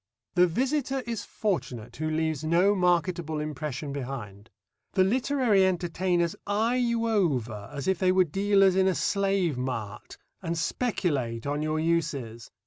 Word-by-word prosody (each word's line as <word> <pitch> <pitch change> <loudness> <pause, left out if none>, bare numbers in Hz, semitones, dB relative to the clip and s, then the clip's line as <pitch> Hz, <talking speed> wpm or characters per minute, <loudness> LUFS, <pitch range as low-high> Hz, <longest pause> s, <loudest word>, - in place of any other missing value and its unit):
The 180 0 +5
visitor 265 - 0
is 230 -2 -3
fortunate 130 - -3
who 155 0 -2
leaves 160 -1 -1
no 175 +6 +3
marketable 175 -4 +1
impression 150 -1 -4
behind. 120 -6 -6 0.4
The 190 - +4
literary 240 -1 +2
entertainers 175 -1 0
eye 220 +5 +1
you 235 -2 +1
over, 125 - 0
as 140 -2 -5
if 190 -2 +1
they 185 -1 +3
were 185 0 +5
dealers 195 +2 +3
in 190 0 +3
a 185 - +2
slave 195 -9 +1
mart, 120 -5 -5 0.2
and 165 0 -3
speculate 150 - -1
on 145 +1 -1
your 155 0 -1
uses. 150 -9 -1
170 Hz, 140 wpm, -27 LUFS, 145-195 Hz, 0.4 s, The